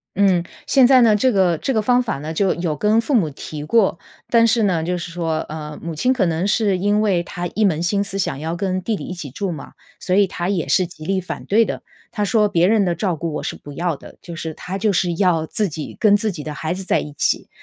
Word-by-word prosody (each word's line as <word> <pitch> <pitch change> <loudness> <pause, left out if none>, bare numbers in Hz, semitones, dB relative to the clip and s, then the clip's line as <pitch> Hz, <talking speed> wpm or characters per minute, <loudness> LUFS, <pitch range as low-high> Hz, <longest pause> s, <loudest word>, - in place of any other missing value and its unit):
嗯， 190 -3 +3 0.2
现 265 -2 +5
在 260 -1 +6
呢， 225 -3 +5
这 255 +5 +3
个 185 -5 +2
这 270 - -1
个 220 - +3
方 245 +3 +3
法 235 - -3
呢， 155 +3 -5
就 195 +3 +2
有 170 -3 -2
跟 210 +8 +2
父 280 - -3
母 195 - +3
提 150 +1 -7
过， 205 +6 +2 0.3
但 230 -1 +5
是 230 0 +2
呢， 180 -5 +1
就 180 +2 -1
是 175 0 -6
说， 165 -2 -2
呃， 150 -1 -7
母 165 0 -5
亲 250 +12 +1
可 250 -7 +2
能 170 +2 0
是 205 -2 +2
因 205 +2 +2
为 195 -5 +2
她 175 0 -6
一 215 - +1
门 170 -5 +2
心 200 +3 +1
思 195 -1 -5
想 160 -8 -2
要 160 +3 -3
跟 185 0 -2
弟 220 +4 -1
弟 - - -7
一 - - -5
起 170 -6 -7
住 190 +8 -3
嘛， 155 -4 -8 0.3
所 185 - -1
以 200 0 +5
她 180 -1 -4
也 185 -6 -1
是 185 -2 +2
极 155 -2 -12
力 190 +2 0
反 185 - -7
对 225 +3 +3
的。 - - -5 0.3
她 210 -2 -2
说 210 0 +2
别 170 -2 +3
人 215 0 +3
的 175 -2 0
照 180 0 -1
顾 165 +1 -4
我 - - -4
是 - - -3
不 145 - -11
要 170 +2 -1
的， - - -14
就 170 - -9
是 160 -1 -5
她 190 +2 -5
就 215 +1 +2
是 180 -2 +1
要 175 -5 +2
自 205 +5 -1
己 155 -1 -7
跟 210 -3 +5
自 215 0 -1
己 160 -5 -7
的 155 - -5
孩 160 +3 -2
子 190 +1 -6
在 - - +1
一 150 - -7
起。 - - 0
185 Hz, 290 characters per minute, -20 LUFS, 165-210 Hz, 0.3 s, 在